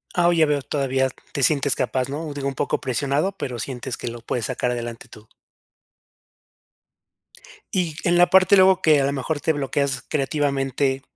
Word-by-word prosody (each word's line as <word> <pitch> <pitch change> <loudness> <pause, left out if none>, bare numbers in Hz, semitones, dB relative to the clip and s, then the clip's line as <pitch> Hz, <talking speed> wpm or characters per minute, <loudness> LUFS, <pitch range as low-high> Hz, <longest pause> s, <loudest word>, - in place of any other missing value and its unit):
Ah, 175 -1 +4
oh, 175 - +4
ya 160 -2 +4
veo. 145 -2 0
Todavía 135 -1 0 0.2
te 140 - -3
sientes 140 -1 +3
capaz, 130 -1 -1
¿no? 150 +2 -5
digo, 140 -1 -3
un 135 - -2
poco - - -1
presionado, 140 +7 -1
pero 130 -10 -6
sientes 125 +1 -5
que - - -7
lo 120 0 -9
puedes 115 0 -3
sacar 125 - -2
adelante 120 -1 -6
tú. 110 +1 -15 2.5
Y 175 -5 0
en 175 -1 +3
la 175 - +5
parte 190 +1 +6
luego, 190 -1 +5
que 155 -3 +5
a 135 - +1
lo 140 - 0
mejor 145 +2 -3
te 160 - +1
bloqueas 140 -2 -1
creativamente, 135 -2 -1
140 Hz, 180 wpm, -22 LUFS, 130-160 Hz, 2.5 s, parte